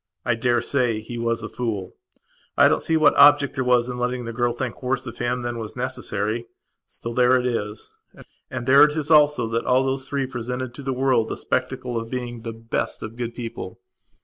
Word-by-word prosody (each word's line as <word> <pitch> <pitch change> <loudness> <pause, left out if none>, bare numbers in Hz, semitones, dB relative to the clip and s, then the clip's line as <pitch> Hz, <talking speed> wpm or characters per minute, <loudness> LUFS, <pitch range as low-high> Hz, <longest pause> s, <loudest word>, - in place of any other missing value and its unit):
I 120 - +2
daresay 120 0 +1
he 115 +2 -7
was 115 0 -1
a - - -3
fool; 110 -8 -4 0.6
I - - +7
don't - - +2
see 160 - +1
what 155 - +5
object 145 0 +6
there 130 - -1
was 125 -1 +3
in 125 -1 -5
letting 125 0 -2
the 115 - -5
girl 120 +1 +1
think 120 0 -5
worse 130 0 -1
of 120 - -8
him 120 +1 -1
than 120 -1 -3
was 110 -1 -6
necessary. 120 -3 -3 0.4
Still 115 - -7
there 125 +1 +4
it 125 - -1
is. 105 -4 -3 0.6
And 130 -2 -5
there 135 +3 +6
it 150 +1 +3
is 155 +1 -2
also 150 -6 +5
that 115 +1 -1
all 130 +1 +4
those 135 0 -2
three 140 -1 -1
presented 125 0 -5
to 130 - -9
the 135 -1 -3
world 130 -3 +1
the - - -4
spectacle 130 -2 -2
of 115 0 -7
being 120 -2 -5
the 115 - -5
best 115 +1 -4
of 110 +1 -7
good 120 -1 -5
people. 115 -6 -7
125 Hz, 210 wpm, -23 LUFS, 115-130 Hz, 0.6 s, I